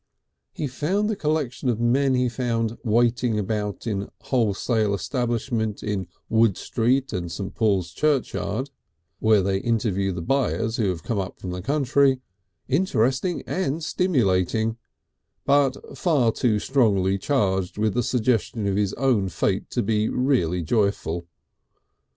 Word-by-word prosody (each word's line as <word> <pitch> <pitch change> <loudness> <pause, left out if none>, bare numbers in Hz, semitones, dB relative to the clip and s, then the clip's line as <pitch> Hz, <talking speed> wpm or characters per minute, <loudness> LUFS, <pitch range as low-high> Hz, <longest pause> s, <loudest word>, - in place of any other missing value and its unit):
He 150 - -4
found 180 - 0
the - - -1
collection 150 -6 -1
of 115 -2 0
men 130 +3 +2
he 125 0 +2
found 115 -2 -1
waiting 120 0 +2
about 105 0 -2
in 100 -3 -2
wholesale 110 -3 +1
establishments 115 -2 -2
in 100 -4 -2 0.2
Wood 110 -3 +3
Street 130 +4 0
and 85 -2 -3
St. 95 +1 -5
Paul's 100 -6 +1
Churchyard 130 - -1 0.5
(where 110 -3 +4
they 95 0 0
interview 100 -4 0
the 85 -2 -5
buyers 115 -1 0
who 105 -4 +1
have 85 -3 -4
come 110 -4 -1
up 95 0 -5
from 90 - -5
the 90 0 -4
country) 135 +2 +2 0.5
interesting 135 - +1
and 165 -3 -2
stimulating, 110 - +1 0.7
but 140 -1 +3 0.2
far 140 -10 +2
too 110 -2 +1
strongly 100 -6 +2
charged 95 -8 0
with 105 -1 +1
the 125 - +1
suggestion 120 -3 0
of 100 -1 0
his 100 -2 0
own 120 -8 +1
fate - - -1
to - - -1
be 105 +1 +1
really 105 - +1
joyful. 85 -3 0
115 Hz, 140 wpm, -24 LUFS, 100-130 Hz, 0.7 s, where